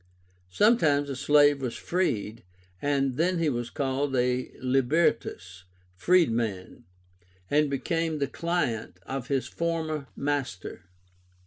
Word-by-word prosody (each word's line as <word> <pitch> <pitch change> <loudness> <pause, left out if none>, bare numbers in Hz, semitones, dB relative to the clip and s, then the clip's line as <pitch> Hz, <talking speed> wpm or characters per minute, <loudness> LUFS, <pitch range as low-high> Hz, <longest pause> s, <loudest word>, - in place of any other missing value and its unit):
Sometimes 145 - +3
a - - -3
slave 145 +1 +4
was 125 -3 -3
freed, 115 - -2 0.4
and 135 -2 0
then 180 +2 +1
he 165 -2 +1
was 120 -3 -3
called 135 0 -1
a 125 0 0
LIBERTUS 125 - 0 0.3
(freedman) 115 - +1 0.7
and 150 0 +3
became 160 +3 -1
the 140 - 0
client 140 - -2
of 135 0 -5
his 135 -2 0
former 160 -4 -2
master. 135 -11 -3
140 Hz, 110 wpm, -27 LUFS, 125-155 Hz, 0.7 s, slave